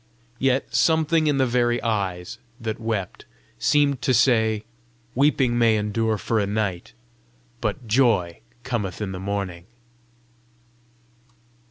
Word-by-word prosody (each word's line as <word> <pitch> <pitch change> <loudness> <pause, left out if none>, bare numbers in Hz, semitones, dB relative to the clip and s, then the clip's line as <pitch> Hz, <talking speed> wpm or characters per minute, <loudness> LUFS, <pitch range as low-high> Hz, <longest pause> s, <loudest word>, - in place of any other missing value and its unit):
Yet 135 0 0
something 160 -1 +3
in 145 -2 +2
the 135 - +3
very 120 -1 +1
eyes 95 -6 -2 0.2
that 110 -1 -4
wept 110 -5 -4 0.3
seemed 140 -3 +2
to 125 0 +2
say, 110 -3 +3 0.5
"Weeping 130 -3 +2
may 115 -2 +4
endure 110 +1 0
for 110 +2 -1
a 100 - 0
night, 100 -4 -2 0.7
but 115 +3 -3
joy 110 -7 +2 0.2
cometh 115 -7 -3
in 105 -3 -3
the 95 - -6
morning." 95 -3 -4
115 Hz, 120 wpm, -23 LUFS, 100-125 Hz, 0.7 s, may